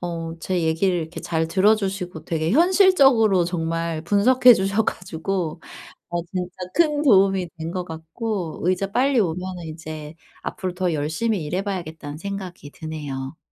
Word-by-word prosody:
어 165 -2 -4
제 180 0 -1
얘기를 165 +3 +1
이렇게 160 +1 -6
잘 160 -1 -1
들어주시고 190 -2 +1
되게 160 -1 -1
현실적으로 275 - +5
정말 165 -1 -2
분석해 245 +7 +6
주셔 195 +2 +1
가지고 180 -2 -3 0.5
어 175 0 -1
진짜 180 0 -4 0.2
큰 300 -3 +3
도움이 195 - +4
된 160 +1 -4
것 180 0 -3
같고 165 +3 -5
의자 185 +3 0
빨리 260 +3 +3
오면은 180 -1 -2
이제 155 -1 -8 0.3
앞으로 185 -4 -4
더 180 -2 -1
열심히 160 +7 -1
일해 180 +5 -1
봐야겠다는 160 -7 -5
생각이 185 -4 -7
드네요. 145 -3 -6
180 Hz, 315 characters per minute, -23 LUFS, 160-200 Hz, 0.5 s, 분석해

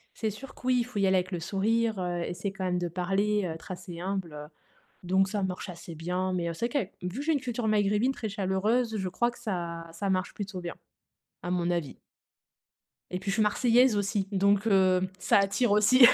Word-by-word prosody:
C'est 220 -2 -1
sûr 260 +7 -10
que - - -11
oui, 255 0 +4
il - - 0
faut 245 -3 -6
y 200 - +3
aller 190 0 +4
avec 185 0 0
le 175 -3 -3
sourire, 215 +5 +1
heu, 175 -1 -2
essayer 190 +3 -3
quand 195 -1 -5
même 180 -1 +1
de 175 0 -1
parler, 195 +4 0
heu, 175 - -2
être 165 - -12
assez 180 -2 -7
humble, 190 -2 -3
heu. 150 0 -7 0.6
Donc 190 +2 +2
ça 205 +1 -2
marche 185 0 -3
assez 170 -1 -8
bien 180 +3 -1
mais, 175 -2 -1
heu, 165 - -3
c'est 230 +8 -1
vrai 275 -9 +1
qu'avec - - -28 0.2
vu 230 - -6
que - - -4
j'ai 320 - +2
une 290 - +1
culture 245 -2 -3
maghrébine 210 +3 +2
très 225 -4 -4
chaleureuse, 210 +4 0
je 190 -3 -2
crois 240 +6 +1
que - - -15
ça 170 -6 -4
ça 195 +4 -2
marche 185 0 0
plutôt 200 -2 -5
bien, 175 -1 -6 0.7
à 175 - -4
mon 175 -1 +1
avis. 170 -6 -2 1.1
Et 180 - -1
puis 195 +2 -3
je - - 0
suis 220 - +3
marseillaise 240 +2 +4
aussi, 200 -1 0
donc, 200 +1 +2
heu, 190 -2 +4 0.2
ça - - +4
attire 200 +3 +2
aussi. 225 +5 +7
195 Hz, 230 wpm, -29 LUFS, 180-215 Hz, 1.1 s, aussi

